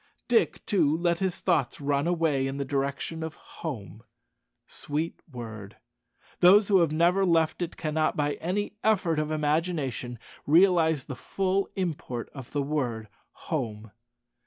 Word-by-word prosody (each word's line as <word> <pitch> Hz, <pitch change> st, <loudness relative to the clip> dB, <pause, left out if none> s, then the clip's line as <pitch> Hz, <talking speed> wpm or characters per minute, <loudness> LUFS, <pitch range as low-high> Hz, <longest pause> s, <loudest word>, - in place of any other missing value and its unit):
Dick, 240 Hz, -2 st, +2 dB
too, 160 Hz, -8 st, +2 dB
let 170 Hz, 0 st, +1 dB
his 190 Hz, -2 st, -1 dB
thoughts 155 Hz, -9 st, +1 dB
run 140 Hz, +1 st, 0 dB
away 160 Hz, -6 st, +1 dB
in 135 Hz, +1 st, -4 dB
the 140 Hz, -, -2 dB
direction 140 Hz, +4 st, -2 dB
of 160 Hz, -1 st, -5 dB
home. 115 Hz, -, -8 dB, 0.6 s
Sweet 155 Hz, +3 st, -4 dB
word! 110 Hz, -5 st, -8 dB, 0.6 s
Those 195 Hz, +4 st, +6 dB
who 195 Hz, -2 st, +6 dB
have 165 Hz, -3 st, +3 dB
never 175 Hz, +5 st, +3 dB
left 165 Hz, -2 st, +2 dB
it 175 Hz, -, -3 dB
cannot, 155 Hz, 0 st, 0 dB
by 145 Hz, -1 st, +1 dB
any 200 Hz, +6 st, -2 dB
effort 185 Hz, -7 st, +2 dB
of 155 Hz, 0 st, -1 dB
imagination, 150 Hz, -5 st, -1 dB, 0.3 s
realize 160 Hz, -3 st, +4 dB
the 135 Hz, -, -6 dB
full 195 Hz, +7 st, -1 dB
import 160 Hz, -10 st, -3 dB
of 135 Hz, -4 st, -9 dB
the 145 Hz, -1 st, 0 dB
word 125 Hz, -7 st, -2 dB, 0.4 s
"home." 110 Hz, -8 st, -3 dB
155 Hz, 140 wpm, -27 LUFS, 135-175 Hz, 0.6 s, Those